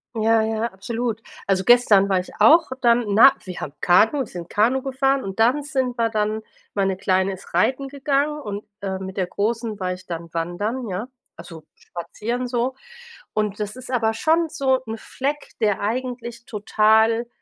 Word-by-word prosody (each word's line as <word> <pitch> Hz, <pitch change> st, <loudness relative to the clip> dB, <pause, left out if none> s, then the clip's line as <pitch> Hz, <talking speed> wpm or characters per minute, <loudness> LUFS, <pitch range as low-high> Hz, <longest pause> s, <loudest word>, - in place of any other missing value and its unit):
Ja, 225 Hz, 0 st, +3 dB
ja, 220 Hz, 0 st, -1 dB
absolut. 225 Hz, +3 st, -3 dB, 0.2 s
Also, 190 Hz, -1 st, +1 dB
gestern 215 Hz, -4 st, +5 dB
war 190 Hz, -1 st, +3 dB
ich 180 Hz, -, -7 dB
auch 325 Hz, +1 st, +6 dB
dann, 240 Hz, -1 st, +4 dB
äh, -, -, -8 dB
na 230 Hz, +7 st, +7 dB
wir 185 Hz, -2 st, -7 dB
haben 140 Hz, -, -5 dB
Kanu 225 Hz, +10 st, +4 dB
sind 175 Hz, -4 st, -9 dB
Kanu 235 Hz, +6 st, +2 dB
gefahren 270 Hz, +1 st, 0 dB
und 195 Hz, +1 st, -6 dB
dann 245 Hz, +6 st, +4 dB
sind 265 Hz, -4 st, -2 dB
wir 230 Hz, 0 st, +2 dB
dann 215 Hz, 0 st, -1 dB, 0.3 s
meine 195 Hz, -2 st, 0 dB
Kleine 190 Hz, 0 st, +1 dB
ist 190 Hz, -2 st, -12 dB
reiten 260 Hz, +10 st, +1 dB
gegangen 285 Hz, +2 st, 0 dB
und, 205 Hz, -5 st, -6 dB, 0.2 s
äh, 190 Hz, -1 st, -3 dB
mit 190 Hz, +1 st, -7 dB
der 185 Hz, -, 0 dB
Großen 220 Hz, +2 st, -2 dB
war 185 Hz, -1 st, -1 dB
ich 185 Hz, +1 st, -12 dB
dann 170 Hz, -1 st, -6 dB
wandern, 205 Hz, +9 st, -3 dB
ja, 200 Hz, +4 st, -4 dB, 0.3 s
also, 165 Hz, -2 st, -11 dB
spazieren 220 Hz, +9 st, -5 dB
so. 245 Hz, +1 st, -1 dB, 0.6 s
Und 210 Hz, -1 st, -1 dB
das 210 Hz, +1 st, -4 dB
ist 255 Hz, 0 st, -9 dB
aber 225 Hz, -3 st, +1 dB
schon 325 Hz, +6 st, +2 dB
so 270 Hz, -4 st, +1 dB
'n 225 Hz, 0 st, -4 dB
Fleck, 285 Hz, +6 st, -4 dB
der 210 Hz, -3 st, +2 dB
eigentlich 235 Hz, +1 st, -4 dB
total, 220 Hz, +2 st, +2 dB
225 Hz, 175 wpm, -22 LUFS, 195-255 Hz, 0.6 s, na